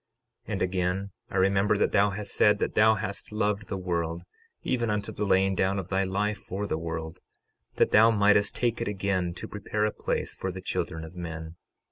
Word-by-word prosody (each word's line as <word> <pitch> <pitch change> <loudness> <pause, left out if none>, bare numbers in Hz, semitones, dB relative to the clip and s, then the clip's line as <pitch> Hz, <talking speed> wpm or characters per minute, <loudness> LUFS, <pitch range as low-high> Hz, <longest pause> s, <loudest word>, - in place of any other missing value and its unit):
12:33 - - -3
And - - -2
again, 95 +2 -1 0.2
I - - -3
remember 100 +2 +3
that - - +2
thou 105 0 +4
hast 100 +1 -5
said 105 -1 +4
that - - -1
thou 110 0 +5
hast 100 0 -5
loved 105 -1 -1
the 100 - -3
world, 85 -2 -2 0.4
even 120 -3 0
unto 105 -1 -1
the 105 - -2
laying 95 0 +3
down 95 +1 +1
of 95 -2 -4
thy 95 0 +1
life 105 +2 -1
for 100 +2 -4
the 80 - -2
world, 80 +1 -5 0.6
that - - +3
thou 110 +2 +7
mightest 105 -2 +3
take 120 -2 0
it - - -1
again 95 -3 -1
to - - -7
prepare 105 +1 -2
a 105 - +1
place - - -2
for 95 - -4
the 95 - -7
children 80 -3 -3
of 80 - -11
men. 80 -2 -6
100 Hz, 205 wpm, -27 LUFS, 90-105 Hz, 0.6 s, thou